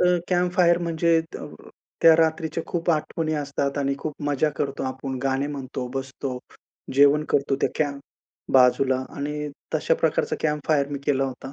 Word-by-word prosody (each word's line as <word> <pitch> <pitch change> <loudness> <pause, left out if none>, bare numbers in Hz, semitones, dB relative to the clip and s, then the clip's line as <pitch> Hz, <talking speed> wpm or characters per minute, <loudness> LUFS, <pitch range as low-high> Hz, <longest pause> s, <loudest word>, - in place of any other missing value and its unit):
तर 180 0 +4
camp 180 -1 +1
fire 170 -1 +4
म्हणजे 165 -1 +2
त - - -6 0.6
त्या 165 -1 +9
रात्रीच्या 160 0 0
खूप 170 0 -1
आठवणी 155 0 -1
असतात 140 -1 -2
आणि 140 -1 0
खूप 155 -2 -5
मजा 145 +1 +2
करतो 140 -1 -2
आपण, 130 0 -4
गाणे 135 +1 0
म्हणतो, 130 -3 -5
बसतो, 135 -1 -4 0.6
जेवण 145 +2 +5
करतो 140 -1 +1
त्या - - +2
कॅम्प 145 -2 -1 0.5
बाजूला 130 +1 +5 0.2
आणि 150 +1 -3 0.3
तशा 155 +1 +2
प्रकारचा 160 - +1
कॅम्प 150 -2 -1
फायर 140 -3 +2
मी 145 - -3
केला 135 -1 +2
होता. 135 +1 -6
145 Hz, 160 wpm, -24 LUFS, 135-160 Hz, 0.6 s, त्या